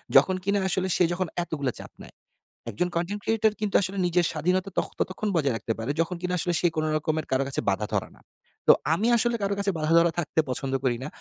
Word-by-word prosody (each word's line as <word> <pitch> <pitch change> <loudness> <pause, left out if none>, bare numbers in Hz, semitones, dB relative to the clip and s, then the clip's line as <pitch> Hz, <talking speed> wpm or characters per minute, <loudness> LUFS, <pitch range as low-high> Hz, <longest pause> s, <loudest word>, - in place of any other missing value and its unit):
যখন 185 - +6
কিনা 200 +1 +1
আসলে 190 0 0
সে - - +4
যখন 185 +1 -1 0.2
এতগুলো 145 -6 -2
চাপ - - -10
নেয়। - - -15 0.5
১ - - -8
জন 180 - +2
কনটেন্ট 185 +5 -2
ক্রিয়েটর 220 -1 +2
কিন্তু 210 -2 -1
আসলে 195 +1 -2
নিজের 175 0 +2
স্বাধীনতা 180 +5 0
তখন, - - -1
ততক্ষণ 195 +3 -2
বজায় 140 -6 +2
রাখতে 115 - -3
পারে, 115 +5 -2
যখন 165 +2 -2
কিনা 180 0 -2
আসলে 175 +2 0
সে 175 - +4
কোন 155 - 0
রকমের 155 0 -2
কারো 130 +1 +2
কাছে 135 - -1
বাঁধা 100 +2 0
ধরা - - -1
না। - - -22 0.5
তো - - +10 0.2
আমি 200 +8 +1
আসলে 235 +1 +1
কারো 200 0 0
কাছে 200 0 +2
বাঁধা 155 +1 0
ধরা 170 0 +4
থাকতে 160 -1 -1
পছন্দ 130 +1 -2
করি 125 -3 +1
না। - - -4
175 Hz, 230 wpm, -26 LUFS, 155-195 Hz, 0.5 s, তো